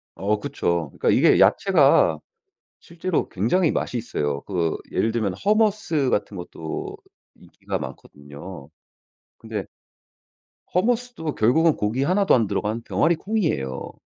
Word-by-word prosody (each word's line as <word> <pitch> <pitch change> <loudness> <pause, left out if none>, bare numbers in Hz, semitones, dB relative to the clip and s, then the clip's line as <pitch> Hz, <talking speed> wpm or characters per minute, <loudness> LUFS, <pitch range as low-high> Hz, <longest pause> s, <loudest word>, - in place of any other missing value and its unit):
어 105 +2 -1
그쵸. 85 -7 -2
그러니까 - - -1
이게 - - +5
야채가 140 - +4 0.6
실제로 170 0 -3
굉장히 150 - +1
맛이 125 - -2
있어요. 75 -11 -3
그거 85 -5 -2
예를 110 - +1
들면 110 -5 -1
hummus 210 - +2
같은 105 0 -1
것도 80 -2 -6 0.4
인기가 - - -6
많거든요. 70 +2 -10 0.7
근데 110 -4 -6 1.1
hummus도 225 -5 -1
결국은 155 +9 +3
고기 110 +6 -1
하나도 190 +3 +3
안 115 -4 +2
들어간 110 +4 -2
병아리콩이에요. 165 - -1
115 Hz, 315 characters per minute, -23 LUFS, -, 1.1 s, 이게